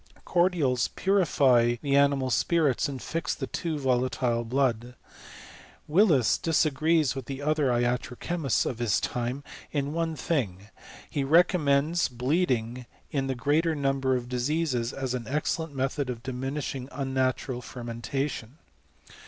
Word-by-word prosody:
Cordials 170 -9 +2
purify 140 -11 +3
the 140 -1 0
animai 140 -2 +3
afHiits, 150 -3 +2
and 135 -2 -5
fix 165 +5 -3
the 135 - -4
too 160 +3 -3
volalJlc 125 -3 0
blood. 125 -2 0 0.9
Willis 155 - +4
dis 165 -1 +2
agrees 155 0 +2
with 135 -3 -7
the 135 -1 -5
other 150 -1 +2
iatro 120 0 0
cheniists 165 -7 0
of 120 - -3
his 115 -4 +2
time 125 +3 -3 0.3
in 145 0 -2
one 165 0 -1
magi 105 - -1 0.4
he 140 - -2
recommends 155 0 +3
bleeding 125 -2 -1 0.2
in 135 -4 -1
the 135 - -1
greater 155 +6 +1
num 135 -1 0
ber 130 -1 +1
of 120 -1 -3
diseases, 125 -1 -1
as 135 -3 -3
an 125 -2 -4
excellent 150 +2 -2
method 135 +1 -1
of 120 -2 -5
diminishing 135 +1 -4
unnatural 130 -2 -1
fermentation. 120 +2 -5
135 Hz, 135 wpm, -27 LUFS, 125-150 Hz, 0.9 s, Willis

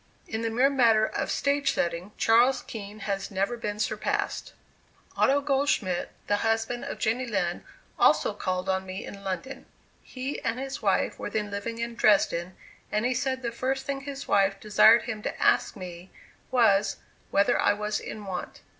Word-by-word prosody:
In 220 - -3
the 230 - -1
mere 255 +5 +3
matter 230 -5 +4
of - - -3
stage 280 0 +1
setting, 175 +3 -2
Charles 240 +4 +4
Kean 210 -1 -8
has 195 -1 -3
never 195 +4 -1
been 210 -3 -4
surpassed. 215 - -2 0.6
Otto 280 +1 +3
Goldschmidt, 270 -10 0 0.2
the 205 - +1
husband 225 +2 -1
of - - -5
Jenny 240 +4 0
Lind, 180 -6 -1 0.4
also - - +4
called 185 0 -2
on 190 0 0
me 190 +1 -6
in 200 0 -10
London. 195 +8 -5 0.3
He 260 +2 -5
and 230 +2 -2
his 270 0 -5
wife - - +1
were - - -4
then 210 -1 -2
living 200 +3 -4
in 235 0 -3
Dresden, 185 -5 +2 0.4
and 210 +2 0
he 255 - +2
said 260 0 -2
the 235 - -2
first 265 +3 -2
thing 275 -1 -3
his 280 0 -7
wife 195 0 +2
desired 215 +2 +6
him 220 -3 -5
to - - -4
ask - - +3
me 180 -2 -9 0.4
was, 210 -5 +3 0.3
whether 200 0 +3
I 205 - +4
was 210 +1 -2
in 210 -1 -7
want. 185 -2 -6
220 Hz, 170 wpm, -27 LUFS, 195-250 Hz, 0.6 s, desired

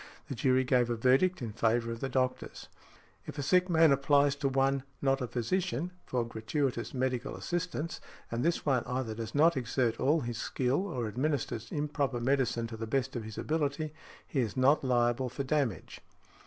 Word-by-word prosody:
The - - -2
jury 130 +1 +2
gave 125 -2 +2
a 120 - 0
verdict 130 +8 +3
in 110 -3 -4
favour 115 +1 +1
of 115 - -5
the 135 - -3
doctors. 130 0 -2 0.6
If - - -7
a 145 - -2
sick 180 +5 +3
man 165 -2 +5
applies 140 +1 +3
to 140 -1 0
one, 135 0 +2 0.2
not 135 -1 +1
a 125 - -1
physician, 170 +6 -1 0.2
for 125 -2 0
|67| - - -10
gratuitous 120 +2 -2
medical 130 -1 -1
assistance, 175 -2 -3 0.3
and 115 +1 -1
this 170 +2 0
one 130 -5 +2
either 125 -3 -2
does 115 +3 -6
not 160 +3 +5
exert 120 -2 0
all 150 +3 +3
his 120 -2 -4
skill, 135 +10 0
or 125 - -3
administers 125 -1 -2
improper 145 -4 -1
medicine 125 -2 +1
to 115 0 -7
the 115 0 -5
best 135 +2 -1
of 120 - -3
his 110 -1 -8
ability, 155 0 -1 0.3
he 140 - -2
is 115 -3 -1
not 135 +4 +4
liable 125 0 +1
for 130 +3 -4
damage. 135 - -2
130 Hz, 185 wpm, -31 LUFS, 120-145 Hz, 0.6 s, man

